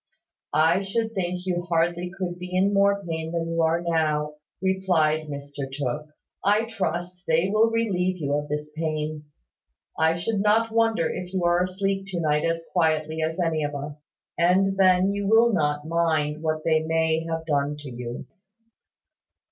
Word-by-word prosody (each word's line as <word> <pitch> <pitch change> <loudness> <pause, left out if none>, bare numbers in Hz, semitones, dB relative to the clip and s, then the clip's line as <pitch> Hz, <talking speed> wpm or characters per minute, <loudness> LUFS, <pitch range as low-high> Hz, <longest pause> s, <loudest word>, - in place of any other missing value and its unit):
"I 160 +4 +4
should 220 +3 -2
think 180 -2 -2
you 175 -2 0
hardly 175 +1 +1
could 180 -2 -4
be 180 0 -7
in 195 +2 +3
more 200 0 +3
pain 160 -1 -4
than 165 -1 -2
you 165 0 0
are 165 +1 +2
now," 150 -2 0 0.2
replied 170 -5 +1
Mr 140 -1 -6
Tooke. 140 +2 -3 0.4
"I 210 +3 +3
trust 180 -5 -3
they 165 +4 +2
will 215 +2 +4
relieve 190 -5 0
you 145 -4 -2
of 145 0 -1
this 150 0 -4
pain. 155 -1 -3 0.7
I 160 +1 +3
should 195 +4 -1
not 220 +2 +3
wonder 225 -7 +2
if 180 0 -5
you 185 - 0
are 175 +1 +3
asleep 195 +1 -1
to 185 -3 -3
night 150 -2 +1
as 165 0 -1
quietly 160 -2 +1
as 160 +3 -2
any 165 -3 0
of 145 0 -3
us; 145 +1 -7 0.4
and 190 +3 +3
then 185 0 +4
you 200 0 -2
will 225 +2 +5
not 150 -3 0
mind 160 -2 0
what 155 -1 -1
they 160 -1 +3
may 160 0 +1
have 165 0 -3
done 145 -1 0
to 140 -3 -8
you." 120 0 -6
165 Hz, 170 wpm, -25 LUFS, 155-190 Hz, 0.7 s, will